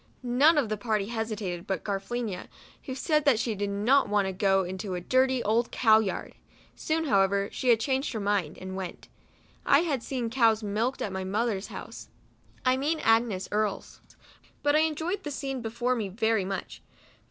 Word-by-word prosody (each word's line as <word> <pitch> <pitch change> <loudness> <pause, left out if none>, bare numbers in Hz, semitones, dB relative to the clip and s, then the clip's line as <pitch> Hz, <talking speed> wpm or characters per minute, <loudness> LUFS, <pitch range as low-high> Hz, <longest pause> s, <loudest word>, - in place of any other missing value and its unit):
None 275 +7 +4
of 280 -6 +2
the 215 - -1
party 215 -2 -1
hesitated 215 -6 -4
but 190 - -2
Garafe 195 -1 -3
lina, 235 -6 -4 0.4
who 260 - -5
said 305 +3 +1
that 275 -6 +5
she 225 0 -1
did 205 0 -2
not 225 +8 +3
want 205 -1 +2
to 190 - -1
go 195 0 +2
into 185 +1 -4
a - - -2
dirty 260 +6 +2
old 225 +3 +1
cow 220 -3 +5
yard. 210 -3 -3 0.4
Soon, 320 +1 -1
however, 200 -4 +2
she 245 -3 +3
changed 265 +5 -1
her 220 - -3
mind, 200 -6 -1
and 190 0 -7
went. 190 -2 -7 0.5
I 280 - +5
had 295 -8 -1
seen 235 -1 -3
cows 230 -3 +3
milked 220 +6 -1
at 200 - -3
my 190 0 -3
mother's 205 +1 -1
house, - - -9 0.6
(I 255 0 +4
mean 305 +4 0
Agnes 225 -4 +2
Earle's); 210 -1 -2 0.6
but 290 0 +3
I - - +5
enjoyed 320 +5 -1
the 295 - -5
scene 270 -2 -4
before 235 +2 -1
me 215 -5 -3
very 220 0 +1
much. 195 -1 -5
225 Hz, 185 wpm, -28 LUFS, 200-260 Hz, 0.6 s, that